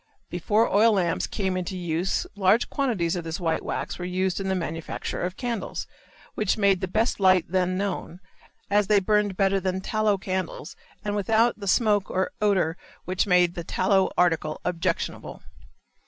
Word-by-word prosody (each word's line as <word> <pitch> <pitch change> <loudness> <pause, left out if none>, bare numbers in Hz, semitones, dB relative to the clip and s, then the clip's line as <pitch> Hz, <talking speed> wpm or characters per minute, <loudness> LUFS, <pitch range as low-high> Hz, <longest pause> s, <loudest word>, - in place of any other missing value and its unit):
Before 220 +1 +2
oil 220 +3 +4
lamps 175 -4 0
came 190 -2 -2
into 185 +1 -3
use 175 +1 -1
large 205 +3 +2
quantities 205 - 0
of 175 - -3
this 165 +3 -4
white 165 -2 0
wax - - -4
were - - -4
used 185 +1 -1
in 195 -1 -2
the 190 - +1
manufacture 165 -2 -4
of 180 +2 -3
candles, 235 -6 -3 0.5
which 210 -1 0
made 200 -3 +3
the 190 - -1
best 220 +5 0
light 185 -3 +4
then 185 0 0
known, 190 -3 -3 0.5
as 205 -1 +2
they 210 0 +5
burned 205 -1 +1
better 195 -1 +2
than 185 0 -2
tallow 215 +1 +1
candles 185 -4 -4 0.3
and 205 0 -1
without 225 +3 +2
the 200 - -6
smoke 205 -1 +2
or 185 0 -1
odor 185 -5 +2 0.3
which 185 +2 0
made 180 -2 +4
the 170 - -5
tallow 190 +3 +2
article 165 -3 +1
objectionable. 175 -1 -3
190 Hz, 170 wpm, -25 LUFS, 180-205 Hz, 0.5 s, they